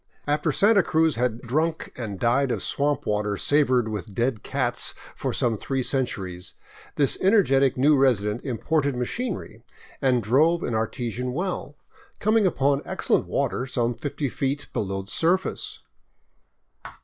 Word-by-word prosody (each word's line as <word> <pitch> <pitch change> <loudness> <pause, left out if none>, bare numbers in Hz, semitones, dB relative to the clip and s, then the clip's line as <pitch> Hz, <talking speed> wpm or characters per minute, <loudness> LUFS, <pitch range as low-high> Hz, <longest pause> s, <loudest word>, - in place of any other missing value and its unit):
After 150 +2 +1
Santa 205 +6 +5
Cruz 160 -2 +2
had 120 -1 -1
drunk 155 +7 -1
and 105 -6 -5
died 125 +3 +2
of - - -2
swamp 145 -1 0
water 105 -1 -1
savored 130 -4 +2
with 105 -1 -5
dead 120 -1 0
cats 125 -3 -1 0.2
for - - -2
some 115 -2 0
three 135 +4 -2
centuries, 95 -10 -3 0.4
this 140 -3 +1
energetic 140 - +4
new 145 +4 +5
resident 120 -5 +2
imported 140 +2 0
machinery 125 - -4 0.4
and 125 -4 +2
drove 155 - +3
an 120 - -2
artesian 120 +2 -2
well, 175 -2 -3 0.4
coming 215 -1 +3
upon 140 -4 +1
excellent - - 0
water 130 - -1
some 120 -2 0
fifty 145 +3 -3
feet 135 +3 -3
below 95 -4 -2
the 100 - -14
surface. 180 +3 0
130 Hz, 135 wpm, -25 LUFS, 115-150 Hz, 0.4 s, Santa